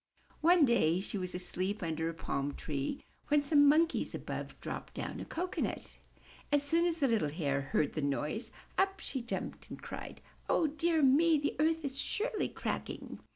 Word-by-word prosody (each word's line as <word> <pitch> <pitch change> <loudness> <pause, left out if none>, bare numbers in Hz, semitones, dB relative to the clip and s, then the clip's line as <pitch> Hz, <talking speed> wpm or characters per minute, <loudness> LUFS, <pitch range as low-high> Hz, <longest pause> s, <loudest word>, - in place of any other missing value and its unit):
One 340 -1 +6
day 185 - +3
she 200 +1 -4
was 180 -1 -3
asleep 185 +2 -1
under 160 0 -1
a - - -4
palm 140 -3 -2
tree 145 - -3 0.2
when 295 0 +3
some 285 0 +6
Monkeys 325 +3 +2
above - - -6
dropped - - -6
down - - -4
a - - -5
cocoanut. 360 +2 -3 0.5
As 290 -1 +5
soon 330 +4 +3
as 335 -1 0
the 285 -4 +2
little 220 - +2
Hare 145 -3 -1
heard 140 +1 0
the 155 - -2
noise, 150 - -1 0.3
up 385 +1 +2
she 265 - -3
jumped 235 - -5
and - - -7
cried, - - -7 0.3
''O 310 -2 +2
dear 325 0 +2
me! 310 +5 +5
the 290 0 -1
earth 320 0 +2
is 275 0 -1
surely 440 0 -1
cracking!'' - - -5
275 Hz, 175 wpm, -33 LUFS, -, 0.5 s, One